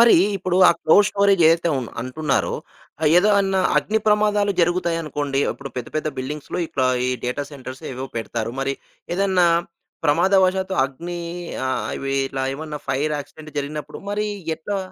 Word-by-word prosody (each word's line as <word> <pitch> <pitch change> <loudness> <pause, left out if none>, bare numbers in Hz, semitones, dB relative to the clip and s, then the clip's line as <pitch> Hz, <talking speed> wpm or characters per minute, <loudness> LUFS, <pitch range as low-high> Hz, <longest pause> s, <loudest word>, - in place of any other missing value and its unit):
మరి 235 -1 +8 0.2
ఇప్పుడు 185 -1 -1
ఆ - - +8
క్లౌడ్ 205 +6 +5
స్టోరేజేదైతే 175 -5 +4
ఉన్ 125 -3 -4
అంటున్నారో, 135 +4 -1 0.5
ఆహ్, 155 - +3
ఏదో 210 +3 +4
అన్నా 195 -1 +1 0.2
అగ్నిప్రమాదాలు 210 -1 +2
జరుగుతాయనుకోండి, 165 -5 0
ఇప్పుడు 135 - -9
పెద్ద 125 - -4
పెద్ద 155 0 -1
బిల్డింగ్స్‌లో 145 +6 -4
ఇట్లా 130 -4 0 0.2
ఈ - - +1
డేటా 125 +4 -2
సెంటర్సేవో 130 -1 -7
పెడతారు. 115 0 -3
మరి 135 0 -1 0.4
ఏదన్నా 190 -2 +3 0.6
ప్రమాదవసాత్తు 190 +4 +3
అగ్ని 170 +6 -5 0.5
ఆహ్, 130 - -1
ఇవి 135 0 -2 0.2
ఇలా 135 -1 -2
ఏమన్నా 150 0 -6
ఫైర్ 145 +3 0
యాక్సిడెంట్ 155 +2 -10
జరిగినప్పుడు 150 +1 -5
మరి 210 +1 -1 0.3
ఎట్లా? 200 +4 -3
155 Hz, 135 wpm, -22 LUFS, 135-190 Hz, 0.6 s, మరి